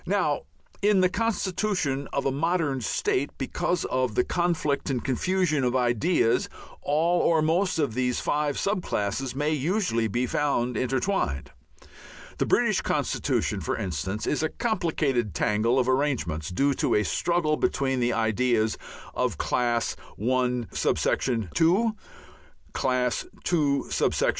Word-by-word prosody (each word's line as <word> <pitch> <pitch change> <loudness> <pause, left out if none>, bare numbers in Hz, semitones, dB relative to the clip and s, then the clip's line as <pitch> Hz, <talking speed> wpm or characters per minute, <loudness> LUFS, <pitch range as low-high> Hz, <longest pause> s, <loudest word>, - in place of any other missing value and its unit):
Now - - +1 0.4
in 205 -2 +4
the 185 - +4
constitution 185 -9 -1
of 140 - -1
a 135 - +2
modern 150 -2 0
state, 130 +4 0
because 175 +6 -1
of 130 -4 -1
the - - +3
conflict 170 -6 0
and 130 -3 -1
confusion 155 +2 +1
of 125 0 +1
ideas, 120 - +2 0.3
all 165 +4 +2
or 160 -2 +3
most 175 +4 +1
of 145 -7 0
these 125 0 0
five 145 -1 0
sub 200 -1 0
classes 120 - -2
may 150 +2 0
usually 155 - 0
be 120 +4 0
found 125 -3 0
intertwined. 130 - -1 0.9
The - - +1
British - - +2
constitution, - - -1
for - - -2
instance, 95 +4 -3
is 150 - 0
a 160 - 0
complicated 155 - -1
tangle 110 +4 +1
of 130 -1 +2
arrangements, 130 - 0
due 140 +10 +1
to - - +1
a 105 - +3
struggle 170 - +1
between 135 -3 0
the 120 0 +1
ideas 110 0 +1 0.4
of - - -1
Class 120 -1 0 0.2
I.(2), 125 - +1 0.8
Class 125 -2 0 0.3
II. 145 -4 +2
135 Hz, 130 wpm, -26 LUFS, 120-165 Hz, 0.9 s, in